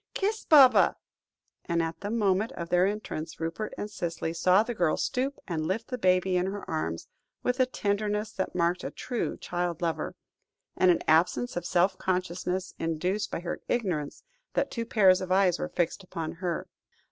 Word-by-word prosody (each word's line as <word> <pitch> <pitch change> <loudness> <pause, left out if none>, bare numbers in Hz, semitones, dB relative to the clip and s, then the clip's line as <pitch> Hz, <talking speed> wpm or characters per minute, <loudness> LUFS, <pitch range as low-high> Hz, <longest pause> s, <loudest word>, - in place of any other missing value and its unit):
Kiss 425 +2 -1
Baba," 275 -5 +7 0.7
and, 170 -1 +1
at 165 0 -4
the 205 - -3
moment 210 -1 +1
of 170 -1 -6
their 180 +1 +4
entrance, 175 -6 -5
Rupert 165 +6 -3
and 205 - -3
Cicely 170 -5 -3
saw 185 +4 +4
the 240 +1 -4
girl 175 -7 +1
stoop 265 +2 -1
and 160 -4 -2
lift 215 +6 -2
the 250 - -3
baby 185 0 +3
in 180 +1 +1
her 200 +1 -5
arms, 85 - -3 0.4
with 250 +1 0
a 255 - +4
tenderness 210 -2 -1
that 190 -4 -3
marked 175 +1 +1
a - - -3
true 245 -2 -3
child 175 -2 -3
lover, 165 -2 -2 0.6
and 185 - +4
an 175 - +3
absence 170 +10 +3
of 175 -1 -3
self 180 +2 +2
consciousness 180 0 -2
induced 180 +6 -1
by - - -4
her 175 - -4
ignorance 180 -12 -2 0.3
that - - +1
two 230 -1 -3
pairs 190 -5 +5
of 185 0 -4
eyes 185 -2 +3
were - - -3
fixed 175 +3 -1
upon 165 -3 -5
her. 175 -2 -2
185 Hz, 180 wpm, -28 LUFS, 170-210 Hz, 0.7 s, Baba